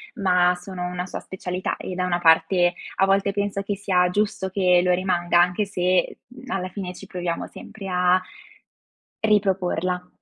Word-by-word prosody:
ma 180 Hz, -4 st, +3 dB
sono 180 Hz, 0 st, -6 dB
una 180 Hz, 0 st, -4 dB
sua -, -, -6 dB
specialità 185 Hz, -1 st, -4 dB
e 185 Hz, -, -6 dB
da 180 Hz, 0 st, -1 dB
una 175 Hz, -1 st, 0 dB
parte 175 Hz, +2 st, +4 dB, 0.2 s
a 195 Hz, -, +4 dB
volte 195 Hz, +1 st, +2 dB
penso 200 Hz, 0 st, -1 dB
che 200 Hz, 0 st, -2 dB
sia 185 Hz, -2 st, +2 dB
giusto 205 Hz, 0 st, -1 dB
che 180 Hz, -2 st, +3 dB
lo 180 Hz, -, +2 dB
rimanga, 175 Hz, -2 st, +1 dB
anche 180 Hz, +4 st, +1 dB
se, 185 Hz, -2 st, 0 dB
mhmm, 255 Hz, 0 st, -13 dB
alla 185 Hz, -1 st, -2 dB
fine 185 Hz, -1 st, -6 dB
ci -, -, -11 dB
proviamo 175 Hz, -2 st, -3 dB
sempre 205 Hz, -3 st, -10 dB
a 180 Hz, 0 st, +3 dB, 1.0 s
riproporla. 185 Hz, -4 st, +1 dB
185 Hz, 165 wpm, -23 LUFS, 180-195 Hz, 1.0 s, parte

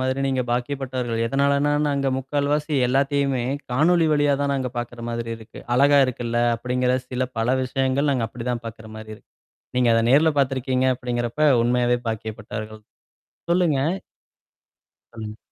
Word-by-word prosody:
மாதிரி 130 Hz, +1 st, -1 dB
நீங்க 130 Hz, -1 st, 0 dB
பாக்கியப்பட்டவர்கள். 125 Hz, -2 st, -2 dB
எதனாலனா 140 Hz, +3 st, +2 dB, 0.2 s
நாங்க 140 Hz, -1 st, 0 dB
3/4 140 Hz, +2 st, -1 dB
வாசி 150 Hz, 0 st, -1 dB
எல்லாத்தையுமே 135 Hz, 0 st, +1 dB, 0.3 s
காணொளி 160 Hz, +6 st, +3 dB
வழியா 145 Hz, -1 st, +3 dB
தான் 140 Hz, 0 st, +1 dB
நாங்க 130 Hz, -2 st, -2 dB
பார்க்கற 120 Hz, 0 st, -6 dB
மாதிரி 115 Hz, 0 st, -4 dB
இருக்கு. 110 Hz, 0 st, -12 dB
அழகா 140 Hz, +2 st, +5 dB
இருக்குல்ல 120 Hz, -2 st, -2 dB, 0.2 s
அப்டிங்கிற 125 Hz, +1 st, 0 dB
சில 130 Hz, 0 st, -1 dB
பல 115 Hz, +2 st, 0 dB
விஷயங்கள் 135 Hz, +2 st, 0 dB
நாங்க 125 Hz, -5 st, 0 dB
அப்டிதான் 120 Hz, 0 st, -4 dB
பார்க்கற 110 Hz, -1 st, -9 dB
மாரி 110 Hz, 0 st, -9 dB
இருக்கு. -, -, -21 dB, 0.5 s
நீங்க 125 Hz, -1 st, +3 dB
அத 115 Hz, -, +3 dB
நேர்ல 150 Hz, +5 st, +5 dB
பார்த்துருக்கீங்க 130 Hz, -1 st, +1 dB
அப்டிங்கிறப்ப 120 Hz, +4 st, 0 dB
உண்மையாவே 120 Hz, 0 st, +2 dB
பாக்கியப்பட்டர்கள் 110 Hz, 0 st, -6 dB, 0.7 s
சொல்லுங்க. 170 Hz, -5 st, +3 dB, 1.5 s
ம். 105 Hz, 0 st, -7 dB
130 Hz, 135 wpm, -23 LUFS, 120-140 Hz, 1.5 s, அழகா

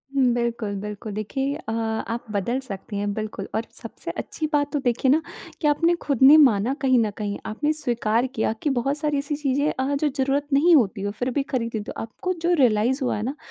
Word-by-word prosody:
हुँ, 270 Hz, -, +4 dB
बिल्कुल, 235 Hz, -3 st, -2 dB
बिल्कुल, 210 Hz, +1 st, -6 dB
देखिए 270 Hz, +7 st, -2 dB
अ, 300 Hz, -8 st, -7 dB
आप 225 Hz, +1 st, -2 dB
बदल 215 Hz, +6 st, -1 dB
सकती 205 Hz, -4 st, -7 dB
हैं, 205 Hz, 0 st, -1 dB
बिल्कुल 215 Hz, -2 st, -5 dB
और 225 Hz, -, -1 dB, 0.2 s
सबसे -, -, -6 dB
अच्छी 310 Hz, -, -4 dB
बात 290 Hz, 0 st, +1 dB
तो 290 Hz, -, +1 dB
देखिए 250 Hz, 0 st, +1 dB
ना 315 Hz, -, +4 dB, 0.4 s
कि 300 Hz, -, +2 dB
आपने 335 Hz, +4 st, +3 dB
खुद 280 Hz, -5 st, -2 dB
ने 280 Hz, +4 st, +9 dB
माना 250 Hz, -3 st, +4 dB
कहीं 260 Hz, -2 st, +4 dB
न 220 Hz, -, +2 dB
कहीं। 205 Hz, -1 st, -3 dB
आपने 255 Hz, +8 st, -1 dB
स्वीकार 240 Hz, -4 st, 0 dB
किया 220 Hz, 0 st, +1 dB
कि 300 Hz, -, +1 dB
बहुत 270 Hz, +2 st, 0 dB
सारी 295 Hz, -1 st, 0 dB
ऐसी 285 Hz, +1 st, -2 dB
चीज़ें 285 Hz, 0 st, 0 dB
अ, 265 Hz, +2 st, -1 dB
जो 300 Hz, +2 st, +1 dB
ज़रूरत 280 Hz, +1 st, 0 dB
नहीं 330 Hz, +5 st, +6 dB
होती 215 Hz, -7 st, +2 dB
हो, 205 Hz, +1 st, -2 dB
फिर 245 Hz, +4 st, -3 dB
भी 275 Hz, +2 st, 0 dB
खरीद 235 Hz, -4 st, -2 dB
लेते 210 Hz, -, -5 dB
हो। -, -, -6 dB
आपको 245 Hz, +11 st, -4 dB
जो 350 Hz, +1 st, +2 dB
रियलाइज़ 250 Hz, +2 st, +3 dB
हुआ 210 Hz, -, -1 dB
ना 260 Hz, +6 st, -3 dB
255 Hz, 220 wpm, -24 LUFS, 220-285 Hz, 0.4 s, ने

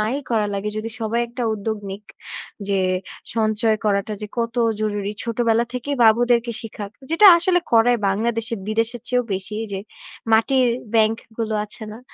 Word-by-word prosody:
নাই 220 Hz, +5 st, 0 dB
করা 215 Hz, -3 st, +2 dB
লাগে 200 Hz, +1 st, -2 dB
যদি 220 Hz, +1 st, -3 dB
সবাই 225 Hz, +2 st, 0 dB
একটা 240 Hz, +1 st, -5 dB
উদ্যোগ 220 Hz, +1 st, -3 dB
নিক 200 Hz, +2 st, -8 dB, 0.6 s
যে 195 Hz, -1 st, +2 dB, 0.6 s
সঞ্চয় 220 Hz, 0 st, +2 dB
করাটা 205 Hz, +1 st, +1 dB
যে -, -, -3 dB
কত 230 Hz, -1 st, -1 dB, 0.3 s
জরুরি। 205 Hz, -1 st, -1 dB
ছোটবেলা 230 Hz, 0 st, +1 dB
থেকেই 275 Hz, +3 st, -3 dB
বাবুদেরকে 235 Hz, +1 st, +4 dB
শিখাক, 210 Hz, -2 st, -7 dB, 0.2 s
যেটা 330 Hz, +6 st, +6 dB
আসলে 355 Hz, +1 st, +2 dB
করায় 235 Hz, +1 st, +5 dB
বাংলাদেশের 225 Hz, +2 st, -1 dB
বিদেশের 230 Hz, +2 st, -1 dB
চেয়েও 250 Hz, -1 st, +1 dB
বেশি 195 Hz, +3 st, -4 dB, 0.2 s
যে 195 Hz, -, -3 dB, 0.5 s
মাটির 255 Hz, +3 st, +4 dB, 0.3 s
ব্যাংক 220 Hz, 0 st, +4 dB, 0.2 s
গুলো 220 Hz, -1 st, -1 dB
আছে 215 Hz, +1 st, -9 dB
না? 220 Hz, -, -9 dB
225 Hz, 155 wpm, -22 LUFS, 215-235 Hz, 0.6 s, যেটা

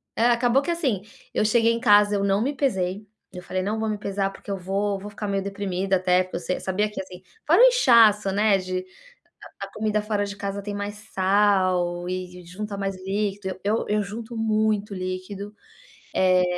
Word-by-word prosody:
é, 230 Hz, -, +2 dB
acabou 245 Hz, +3 st, +3 dB
que, 345 Hz, -, -5 dB
assim, 270 Hz, -, 0 dB, 0.3 s
eu -, -, +1 dB
cheguei 230 Hz, +1 st, +3 dB
em 230 Hz, -, -2 dB
casa 205 Hz, -3 st, +5 dB
eu 200 Hz, -, 0 dB
não 200 Hz, +1 st, +2 dB
me 275 Hz, -, 0 dB
pesei, 200 Hz, -7 st, -1 dB, 0.3 s
eu 180 Hz, 0 st, -8 dB
falei: 185 Hz, +1 st, -2 dB
"Não 210 Hz, +3 st, -2 dB
vou 220 Hz, -, -1 dB
me 210 Hz, -, -2 dB
pesar, 195 Hz, -1 st, -2 dB
porque -, -, -13 dB
eu 195 Hz, -, -2 dB
vou 195 Hz, +2 st, -1 dB
vou 205 Hz, +2 st, -8 dB
ficar 210 Hz, 0 st, -5 dB
meio 195 Hz, -1 st, -1 dB
deprimida", 195 Hz, -1 st, -1 dB
até 180 Hz, 0 st, +3 dB
porque 185 Hz, -, -6 dB
eu -, -, -4 dB
se 180 Hz, +2 st, -2 dB
sabia 205 Hz, +3 st, 0 dB
que, -, -, -7 dB
assim, 185 Hz, -1 st, -11 dB, 0.3 s
fora -, -, +6 dB
o -, -, +10 dB
inchaço, 230 Hz, -, +5 dB
né, 205 Hz, 0 st, +3 dB
de 185 Hz, 0 st, -3 dB, 0.6 s
a -, -, -9 dB
a -, -, -20 dB
comida 215 Hz, -1 st, 0 dB
fora 210 Hz, -1 st, -1 dB
de 200 Hz, 0 st, -6 dB
casa 200 Hz, 0 st, -4 dB
tem 205 Hz, 0 st, -5 dB
mais 205 Hz, +1 st, -4 dB, 0.2 s
sal 185 Hz, -3 st, +2 dB
e 180 Hz, -1 st, -5 dB
junta 200 Hz, +3 st, -6 dB
mais 195 Hz, -1 st, -2 dB
líquido, 195 Hz, -2 st, -2 dB
eu 210 Hz, +3 st, 0 dB
eu 210 Hz, 0 st, +1 dB
junto 225 Hz, +4 st, -7 dB
muito 215 Hz, -2 st, 0 dB
líquido, 185 Hz, +3 st, -5 dB, 0.6 s
eh, 185 Hz, -1 st, +4 dB
200 Hz, 205 wpm, -24 LUFS, 185-215 Hz, 0.6 s, o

